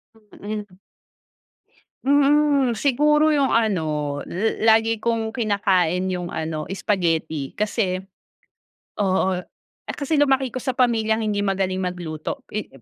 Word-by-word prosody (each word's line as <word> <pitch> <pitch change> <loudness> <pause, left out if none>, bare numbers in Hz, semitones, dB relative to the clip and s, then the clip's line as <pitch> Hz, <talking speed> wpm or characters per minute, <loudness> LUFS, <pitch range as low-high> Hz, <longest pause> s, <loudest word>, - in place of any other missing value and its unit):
Mm. 210 -2 -8 1.3
Mm, 285 -3 +3
siguro 300 +4 +3
yung 280 -2 +2
ano 155 -10 0
la 220 +3 +3
lagi 225 -1 -2
kong 225 -1 -1
kinakain 190 -6 +1
yung 180 -1 -4
ano 155 -1 -4
spaghetti 165 -7 -1
kasi 205 -3 0 1.0
oo, 190 -2 +1
eh, 180 - -12
kasi 290 +1 0
lumaki 270 -3 +2
ko 255 - -4
sa 260 -1 -3
pamilyang 225 -3 +2
hindi 210 -1 -1
magaling 195 -2 0
magluto 180 - -4
i 215 - -3
210 Hz, 110 wpm, -22 LUFS, 180-250 Hz, 1.3 s, Mm